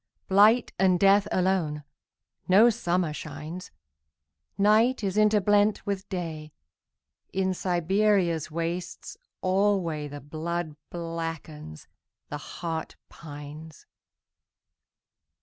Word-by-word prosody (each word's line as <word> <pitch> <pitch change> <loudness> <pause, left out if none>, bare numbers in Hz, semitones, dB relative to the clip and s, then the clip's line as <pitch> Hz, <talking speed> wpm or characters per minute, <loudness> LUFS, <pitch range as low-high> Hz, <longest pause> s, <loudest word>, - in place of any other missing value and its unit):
Blight 210 +5 +5
and 185 -2 +4
death 200 +1 +5
alone.No 185 +4 +1
summer 175 -7 -1
shines. 155 +4 -7 0.9
Night 215 +4 +3
is 195 -1 -1
interblent 210 0 +3
with 200 -1 -3
Day.In 175 +2 -6
Siberia's 180 -2 +1
wastes 170 +2 -4 0.3
alwayThe 170 -7 0
blood 160 +1 -4
blackens, 165 - -6 0.4
the 145 - -5
heart 165 +2 -5
pines. 150 0 -11
175 Hz, 75 wpm, -27 LUFS, 155-200 Hz, 0.9 s, Blight